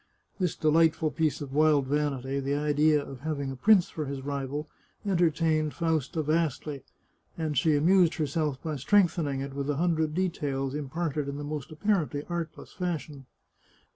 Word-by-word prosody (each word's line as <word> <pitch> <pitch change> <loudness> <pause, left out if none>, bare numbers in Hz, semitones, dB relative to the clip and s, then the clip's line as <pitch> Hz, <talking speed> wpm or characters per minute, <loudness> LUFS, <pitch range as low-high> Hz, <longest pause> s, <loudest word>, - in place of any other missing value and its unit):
This 180 -4 0
delightful 160 0 +3
piece 155 -2 0
of 135 -2 -6
wild 150 -2 +4
vanity, 140 -1 -1
the 140 +1 -1
idea 150 0 +2
of 135 - -9
having 140 -2 -3
a - - -6
prince 195 +6 +5
for 155 - -4
his 135 -1 -5
rival, 140 +1 -3 0.4
entertained 165 -4 +1
Fausta 160 -2 0
vastly, 150 -2 -1 0.6
and 155 -3 -2
she 150 +3 +3
amused 175 +3 +4
herself 150 -2 -1
by 155 -2 -3
strengthening 160 -3 +2
it 135 0 -5
with 140 +1 -3
a 145 - +1
hundred 160 -2 +1
details, 140 -7 -1
imparted 150 0 -2
in 140 - -5
the 145 - -5
most 150 -1 -5
apparently 155 -4 0
artless 170 -2 -5
fashion. 155 -7 -4
150 Hz, 155 wpm, -28 LUFS, 140-165 Hz, 0.6 s, prince